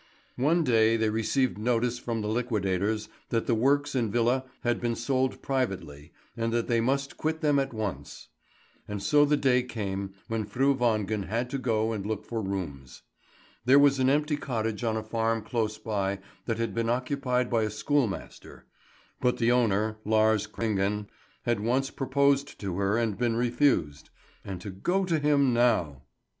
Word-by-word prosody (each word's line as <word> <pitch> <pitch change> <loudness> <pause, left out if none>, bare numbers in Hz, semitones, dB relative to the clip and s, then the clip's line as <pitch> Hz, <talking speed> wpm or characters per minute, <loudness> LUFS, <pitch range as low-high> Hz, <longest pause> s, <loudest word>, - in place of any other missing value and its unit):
One 160 +7 +3
day 115 -4 +4
they 110 -1 +1
received 115 +2 0
notice 120 +1 0
from 115 -2 -3
the - - -2
liquidators 105 -2 -1 0.2
that 115 -1 0
the 120 - +1
works 140 +5 +2
and 120 -5 0
villa 120 +3 +1 0.2
had 120 -1 0
been 120 -1 0
sold 130 +2 -1
privately, 95 - -3 0.2
and 115 0 -1
that 120 -1 0
they 115 -2 +2
must 135 +3 -1
quit 160 +1 -2
them 145 -2 +3
at 135 0 -1
once. 100 - -5 0.6
And 105 -1 -5
so 145 +7 +5
the 150 0 +2
day 125 -3 +3
came 100 -5 -4
when 115 -2 -2
Fru 135 +6 +2
Wangen 110 -5 0
had 120 +5 -2
to 140 - -2
go 110 -3 0
and 105 -3 -3
look 105 0 -3
for 115 -2 -3
rooms. 85 -10 -5 0.6
There 130 +3 +6
was 140 -1 +5
an 130 0 +3
empty 150 +1 +1
cottage 115 -5 -3
on 110 -1 0
a 110 - -3
farm 115 0 -1
close 110 -1 -2
by 100 -3 -2 0.3
that 115 -2 0
had 115 -3 -2
been 115 +1 -1
occupied 125 0 0
by 115 -2 +2
a 110 - 0
schoolmaster; 110 0 -2 0.5
but 125 -1 +1
the 115 +1 +2
owner, 110 -3 +2
Lars 110 -1 +2
Kringen, 105 -1 -1 0.3
had 120 -3 0
once 130 +5 0
proposed 140 +1 +1
to 95 -3 -4
her 100 +2 +1
and 115 -3 -1
been 120 -2 +1
refused; 120 - +1 0.3
and 95 -2 -6
to 100 - -6
go 180 - 0
to 165 -3 +1
him 145 -3 +3
now 110 - +2
115 Hz, 175 wpm, -28 LUFS, 105-130 Hz, 0.6 s, There